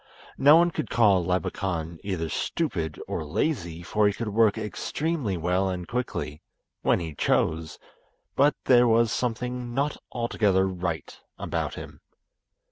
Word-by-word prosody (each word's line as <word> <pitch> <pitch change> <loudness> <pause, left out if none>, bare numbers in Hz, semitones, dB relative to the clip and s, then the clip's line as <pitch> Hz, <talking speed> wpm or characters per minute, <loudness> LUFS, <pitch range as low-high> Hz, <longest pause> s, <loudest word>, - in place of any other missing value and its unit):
No 145 +3 +8
one 170 +1 +5
could 155 - -4
call 100 -6 +4
Labakan 85 -2 -2
either 90 -5 -2
stupid 80 - -2
or - - -3
lazy, 85 - -2
for 105 +3 +2
he 100 - +1
could 115 +1 -4
work 110 0 +3
extremely 115 - -2
well 90 +3 +1
and 90 -2 -4
quickly—when 100 -11 -3
he 80 -3 -5
chose; 80 +2 0 0.6
but 145 +1 +4
there 120 -1 +6
was 115 0 +3
something 125 0 -3
not 140 +2 0
altogether 105 -5 +1
right 85 -5 -4 0.2
about - - -3
him. - - -10
100 Hz, 130 wpm, -26 LUFS, 85-125 Hz, 0.6 s, No